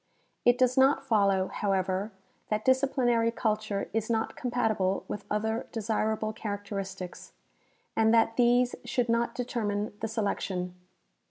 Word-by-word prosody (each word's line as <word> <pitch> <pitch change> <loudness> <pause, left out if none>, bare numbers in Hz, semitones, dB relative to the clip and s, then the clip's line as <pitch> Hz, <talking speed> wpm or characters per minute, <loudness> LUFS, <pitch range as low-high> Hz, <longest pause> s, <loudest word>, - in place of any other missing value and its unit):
It 245 0 +5
does 255 0 +2
not 270 +1 +4
follow, 200 -6 +2
however, 195 +1 -1 0.4
that 215 0 -1
disciplinary 255 -3 +3
culture 215 -3 -1
is 225 0 -1
not 225 -1 0
compatible 220 -6 0
with 205 - -5
other 220 +2 -1
desirable 220 0 -1
characteristics, 200 -3 -6 0.6
and 220 0 +4
that 225 0 +4
these 245 0 +4
should 245 -2 -1
not 235 +1 +1
determine 215 -4 -2
the 225 - -2
selec 220 -2 -1
tion. 180 -2 -3
220 Hz, 125 wpm, -29 LUFS, 205-240 Hz, 0.6 s, It